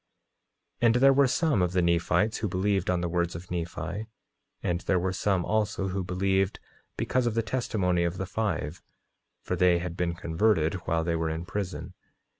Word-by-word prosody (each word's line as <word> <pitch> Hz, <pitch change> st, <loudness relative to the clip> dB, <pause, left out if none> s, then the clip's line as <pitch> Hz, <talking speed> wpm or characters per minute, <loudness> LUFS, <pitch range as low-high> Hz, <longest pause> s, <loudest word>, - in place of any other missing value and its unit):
9:39 120 Hz, -, +5 dB
And 115 Hz, -, +4 dB
there 135 Hz, +2 st, +6 dB
were 140 Hz, 0 st, +5 dB
some 150 Hz, -, +2 dB
of 90 Hz, 0 st, +1 dB
the 90 Hz, -, +3 dB
Nephites 85 Hz, +5 st, +2 dB
who 110 Hz, -, -1 dB
believed 95 Hz, 0 st, 0 dB
on 90 Hz, -1 st, +1 dB
the 90 Hz, -, -1 dB
words 85 Hz, 0 st, -1 dB
of 85 Hz, +2 st, -9 dB
Nephi; 90 Hz, +5 st, -4 dB, 0.6 s
and 85 Hz, 0 st, 0 dB
there 100 Hz, -, +1 dB
were 90 Hz, +1 st, 0 dB
some 95 Hz, -1 st, 0 dB
also, 105 Hz, -3 st, 0 dB
who 95 Hz, +1 st, -2 dB
believed 95 Hz, +1 st, 0 dB, 0.4 s
because 130 Hz, -2 st, +1 dB
of 115 Hz, -, -1 dB
the 115 Hz, -, +1 dB
testimony 105 Hz, -7 st, 0 dB
of 85 Hz, +1 st, -1 dB
the 95 Hz, -, -2 dB
five, 90 Hz, -6 st, -2 dB, 0.6 s
for -, -, -2 dB
they 90 Hz, -1 st, +4 dB
had 85 Hz, 0 st, -4 dB
been 85 Hz, -1 st, -1 dB
converted 85 Hz, -1 st, +1 dB
while 80 Hz, 0 st, +1 dB
they 85 Hz, 0 st, 0 dB
were 80 Hz, -1 st, -1 dB
in 80 Hz, +2 st, -4 dB
prison. 95 Hz, -1 st, -4 dB
90 Hz, 190 wpm, -28 LUFS, 85-105 Hz, 0.6 s, there